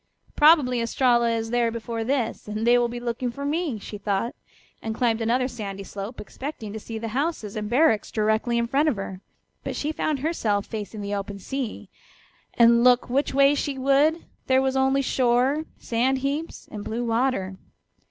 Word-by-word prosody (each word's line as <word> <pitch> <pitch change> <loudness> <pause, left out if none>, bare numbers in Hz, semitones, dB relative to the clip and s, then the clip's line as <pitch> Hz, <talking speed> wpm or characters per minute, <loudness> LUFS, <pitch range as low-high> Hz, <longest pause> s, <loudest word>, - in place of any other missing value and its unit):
"Probably 295 -6 +5
Estralla 235 0 +2
is 225 0 -2
there 240 -1 +2
before 230 0 -4
this, 250 -3 -2
and 215 +1 -3
they 240 +1 +6
will 240 - +2
be 240 +1 -6
looking 240 +1 -2
for 280 +4 -6
me," 300 -4 -1
she 210 0 -8
thought, 205 +3 -1 0.5
and 220 -1 -4
climbed 235 -2 +1
another 245 +3 +1
sandy 200 -5 -6
slope, 200 +5 -7
expecting 220 -1 -7
to 220 - -5
see 225 +1 -7
the 225 0 -4
houses 260 -4 -2
and 210 -1 -3
barracks 240 -4 +3
directly 220 +2 +1
in 235 - +1
front 280 +6 +2
of 280 - 0
her. 190 -1 -6 0.4
But - - -4
she 300 - -2
found 310 -1 -1
herself 220 -11 0
facing 215 -1 -6
the 200 0 -4
open 200 0 -4
sea, 255 +3 -5 0.7
and 235 0 +6
look 250 -1 +4
which 270 +1 0
way 275 +1 +6
she 285 -1 -2
would 280 +5 +2 0.2
there 260 0 +4
was 265 0 0
only 265 +1 +2
shore, 255 +4 +2
sand 250 +3 0
heaps 280 +5 -3
and 210 -1 -6
blue 235 +3 -3
water. 225 -5 0
240 Hz, 180 wpm, -25 LUFS, 220-270 Hz, 0.7 s, they